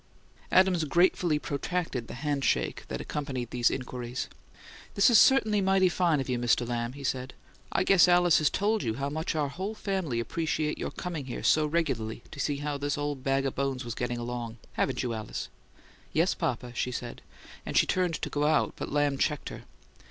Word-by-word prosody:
Adams 185 -3 +4
gratefully 170 0 +3
protracted 145 -3 -3
the - - -7
handshake 140 - 0
that - - -4
accompanied 130 -5 -4
these 120 -1 +3
inquiries. 125 -1 -4 0.7
"This 200 +4 +5
is 230 - +8
certainly 220 -6 +5
mighty 190 -1 +4
fine 170 -4 +2
of 135 - -3
you, 125 -2 -1
Mr. 120 0 +2
Lamb," 120 0 -2
he 140 0 -9
said. 130 -1 -3 0.4
"I - - +2
guess 185 -2 +6
Alice 175 -1 +5
has 155 - +3
told 210 +2 +1
you 110 - -1
how 140 +3 -2
much 160 +2 -2
our 150 -2 0
whole 190 +9 -4
family 190 - -2
appreciate 155 +5 -1
your - - -2
coming 165 -6 -5
here 125 - -5
so 155 -1 +4
regularly 130 -9 -1
to - - -9
see 145 -2 0
how 145 0 -3
this 145 0 -1
old 145 -2 -3
bag 135 0 +1
o' 135 - 0
bones 135 -2 -2
was 120 - -4
getting 120 0 -2
along. 120 -1 -5 0.2
Haven't - - 0
you, 120 -2 -2
Alice?" 110 -2 -5 0.6
"Yes, - - +3
papa," 125 -1 -3
she 125 +1 -1
said; 120 -1 -6 0.4
and - - -6
turned 180 -3 +1
to - - -1
go 145 0 0
out, 155 0 +2
but - - -5
Lamb 145 -1 +1
checked 150 -1 0
her. - - -9
145 Hz, 190 wpm, -28 LUFS, 125-170 Hz, 0.7 s, is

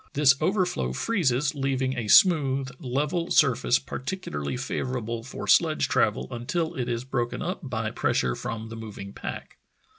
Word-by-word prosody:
This 140 -2 +6
over 185 +3 +2
flow 65 - -2
freezes, 145 - +1
leaving 135 -2 -1
a 115 -3 -3
smooth, 135 - +5
level 150 +7 -1
surface 125 -4 +4
particularly 130 - -4
favorable 125 -3 -3
for 125 - -7
sledge - - +4
travel 65 - +1
until 160 +8 -2
it 125 -2 -3
is 120 0 -2
broken 120 -2 -2
up 180 - -3
by 115 -7 -3
pressure 60 -1 0
from 110 0 -5
the 115 - -7
moving 105 -3 -8
pack. - - -7
130 Hz, 150 wpm, -26 LUFS, 115-145 Hz, -, This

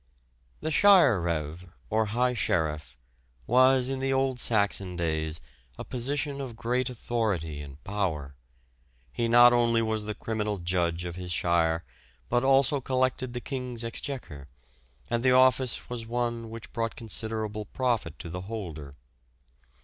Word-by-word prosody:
The 160 - -2
Shire 165 - +6
reve, 85 0 -3 0.3
or 110 +1 +2
high 125 +4 +1
sheriff, 75 - -1 0.5
was 130 +1 +4
in 135 0 -2
the 135 0 0
old 135 -1 +1
Saxon 100 -5 +1
days 80 -2 -1 0.4
a - - -5
position 140 +3 -2
of 125 -4 -6
great 125 +3 -1
authority 105 -11 -2
and 70 0 -11
power. 90 -9 -2 0.8
He 115 - 0
not 120 +1 +7
only 120 -1 +3
was 110 -1 -1
the 105 0 -4
criminal 105 -2 -2
judge 85 -1 -1
of 85 0 -6
his 90 -1 -5
shire, 85 -1 +1 0.5
but 120 +1 +2
also 135 +1 +4
collected 130 -1 0
the 125 - -4
King's 125 -4 -4
exchequer, 115 - -6 0.6
and 120 +6 0
the 130 0 +4
office 130 -1 +3
was 120 -2 -5
one 120 -1 -2
which 115 0 -9
brought 115 -1 -2
considerable 110 -1 -4
profit 115 - -1
to 85 - -7
the 90 +1 -5
holder. 85 -9 -7
115 Hz, 140 wpm, -28 LUFS, 90-125 Hz, 0.8 s, not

